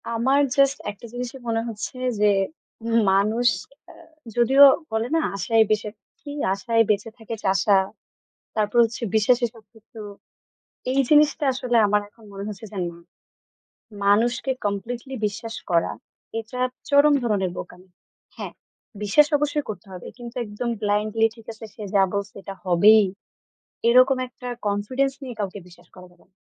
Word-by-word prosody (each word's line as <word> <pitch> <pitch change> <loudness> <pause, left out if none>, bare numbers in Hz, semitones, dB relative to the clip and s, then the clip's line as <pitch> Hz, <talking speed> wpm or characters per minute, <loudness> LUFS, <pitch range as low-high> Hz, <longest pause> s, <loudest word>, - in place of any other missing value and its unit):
আমার 265 +5 +2 0.2
জাস্ট 275 0 +4
একটা 205 +3 -14
জিনিসই 250 +2 -5
মনে 225 0 0
হচ্ছে 225 +3 -6 0.2
যে, 210 0 +4 0.8
মানুষ 215 +5 +2 0.4
আ - - -15 0.4
যদিও 265 +4 +6 0.3
বলে 220 +1 -1
না 325 - +3
আশায় 225 +2 +3
বেঁচে 215 0 0
থাকি, 270 +8 -13 0.2
আশায় 230 +3 +2
বেঁচে 210 +2 +1
থাকে 225 0 -6
চাষা, 195 +1 +3 0.8
তারপর 215 +2 +1
হচ্ছে 230 +1 -5
বিশ্বাসে 240 +3 +3
সবকিছু। 225 0 -16 0.9
এই 275 - +3
জিনিসটা 300 0 +4
আসলে 250 -2 -1
আমার 210 +1 +2
এখন 225 +2 -21
মনে 195 0 -6
হচ্ছে 210 +1 -8
যে 200 - -6
না, 170 - -14 1.1
মানুষকে 240 +6 +2
কমপ্লিটলি 235 +6 -4
বিশ্বাস 225 +2 -7 0.2
করা 170 -1 +2 0.5
এটা 230 +3 -8 0.3
চরম 285 +1 +5
ধরনের 200 -6 0
বোকামি। 180 +1 -9 0.5
হ্যাঁ, - - -6 0.5
বিশ্বাস 295 +9 +5
অবশ্যই 295 0 -1
করতে 215 0 -7
হবে 180 - -9
কিন্তু 240 0 -9
একদম 210 +3 -4
ব্লাইন্ডলি 215 +2 +1
ঠিক 225 -2 -16
আছে, 220 0 -10
সে 215 - -9
যা 195 - +6
বলছে 200 0 -3
এটা 195 - -7
হবেই, 205 +4 +6 0.8
এরকম 255 +2 +5
একটা 250 0 -11 0.2
কনফিডেন্স 255 +7 0
নিয়ে 250 -3 -7
কাউকে 205 0 -3
বিশ্বাস 175 -1 -18
করা 180 -1 -12
যাবে 175 - -26
না। 185 - -48
225 Hz, 145 wpm, -23 LUFS, 205-250 Hz, 1.1 s, যদিও